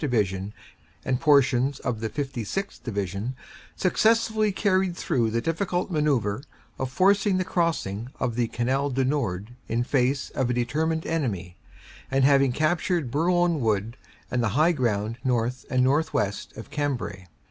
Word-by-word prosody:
Division 105 Hz, -8 st, 0 dB, 0.5 s
and 130 Hz, -2 st, 0 dB
portions 140 Hz, -3 st, +3 dB
of 125 Hz, -4 st, -2 dB
the 110 Hz, 0 st, -2 dB
56th. 140 Hz, -, -4 dB
Division, 100 Hz, +2 st, -3 dB, 0.4 s
successfully 220 Hz, +2 st, +2 dB
carried 190 Hz, -3 st, +1 dB
through 115 Hz, -3 st, +1 dB
the 115 Hz, +1 st, 0 dB
difficult 175 Hz, +5 st, -1 dB
manoeuvre 135 Hz, -, +1 dB, 0.4 s
of 130 Hz, -1 st, -2 dB
forcing 195 Hz, -, +3 dB
the 185 Hz, -, 0 dB
crossing 160 Hz, -, -1 dB
of 120 Hz, -, 0 dB
the 120 Hz, 0 st, 0 dB
Canal 130 Hz, +5 st, 0 dB
du 130 Hz, 0 st, 0 dB
Nord 115 Hz, -7 st, -1 dB, 0.2 s
in 115 Hz, +2 st, 0 dB
face 130 Hz, +1 st, 0 dB
of 130 Hz, -2 st, -1 dB
a 125 Hz, -, 0 dB
determined 160 Hz, +7 st, 0 dB
enemy, 100 Hz, -, -2 dB, 0.5 s
and 135 Hz, 0 st, +2 dB
have 140 Hz, 0 st, +6 dB
captured 155 Hz, -3 st, 0 dB
Bourlon 170 Hz, +2 st, +2 dB
Wood 110 Hz, -1 st, 0 dB, 0.4 s
and 125 Hz, -, +1 dB
the 115 Hz, -, +1 dB
high 160 Hz, +3 st, +5 dB
ground 115 Hz, -6 st, -1 dB
north 125 Hz, 0 st, -1 dB
and 130 Hz, -1 st, +2 dB
northwest 140 Hz, -8 st, 0 dB
of 110 Hz, -, -9 dB
Cambrai. 135 Hz, -10 st, -3 dB
130 Hz, 145 wpm, -26 LUFS, 115-160 Hz, 0.5 s, have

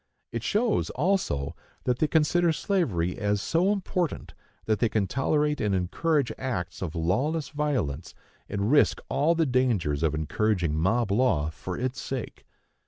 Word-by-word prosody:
It 115 Hz, -, -3 dB
shows, 210 Hz, -, +1 dB
also, 175 Hz, -, 0 dB, 0.3 s
that 125 Hz, -1 st, 0 dB
they 155 Hz, -, +3 dB
consider 165 Hz, +2 st, +3 dB
slavery 120 Hz, -, 0 dB
as 105 Hz, -1 st, +1 dB
so 170 Hz, -, +2 dB
important 185 Hz, -4 st, -2 dB, 0.3 s
that 110 Hz, -1 st, +1 dB
they 115 Hz, -, +2 dB
can 105 Hz, -2 st, +1 dB
tolerate 150 Hz, +6 st, 0 dB
and 105 Hz, -2 st, +1 dB
encourage 130 Hz, -, 0 dB
acts 90 Hz, -, -3 dB
of 90 Hz, -2 st, -4 dB
lawless 130 Hz, -, 0 dB
violence, 145 Hz, -, -2 dB, 0.3 s
and 100 Hz, +3 st, -1 dB
risk 145 Hz, -, +4 dB
all 150 Hz, +5 st, +2 dB
the 165 Hz, -1 st, +2 dB
dangers 115 Hz, -, +1 dB
of 80 Hz, -2 st, +1 dB
encouraging 85 Hz, +1 st, 0 dB
mob 100 Hz, +7 st, +1 dB
law, 100 Hz, -, +2 dB
for 90 Hz, +3 st, -6 dB
its 130 Hz, +1 st, -3 dB
sake. 130 Hz, -4 st, -6 dB
120 Hz, 150 wpm, -27 LUFS, 90-150 Hz, 0.3 s, risk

